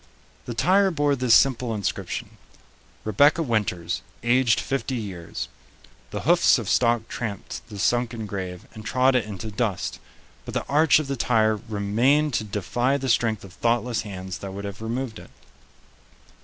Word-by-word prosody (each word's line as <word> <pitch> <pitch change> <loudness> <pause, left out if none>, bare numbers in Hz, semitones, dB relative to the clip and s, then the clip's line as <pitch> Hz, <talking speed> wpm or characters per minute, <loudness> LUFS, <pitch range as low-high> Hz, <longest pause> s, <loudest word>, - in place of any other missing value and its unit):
The 120 - -5
tire 195 +9 +4
bore 145 -4 +1
this 125 -3 +4
simple 125 -4 +3
inscription: 100 -3 -4 0.7
"Rebecca 145 - +4
Winters, 105 - -1 0.2
aged 120 -1 +3
50 135 -1 -2
years." 95 -8 -5 0.6
The - - -4
hoofs - - +5
of - - -5
stock 120 -2 +2
tramped 110 -4 -5
the 105 - -8
sunken 120 +1 0
grave 95 -3 -5
and 110 - -9
trod 130 +6 +3
it 125 -5 +2
into 110 +1 -6
dust, 100 -4 -2 0.4
but - - -8
the - - -1
arch 150 +2 +4
of 155 - -1
the 140 0 -2
tire 110 -3 +2
remained 120 +9 +2
to 110 - 0
defy 110 +7 0
the 135 -1 -3
strength 115 -2 +1
of 95 -2 -12
thoughtless 120 +2 0
hands 95 -3 -6
that 95 -1 -7
would 100 +1 -6
have 100 +1 -7
removed 115 0 -3
it. - - -13
115 Hz, 155 wpm, -24 LUFS, 100-130 Hz, 0.7 s, hoofs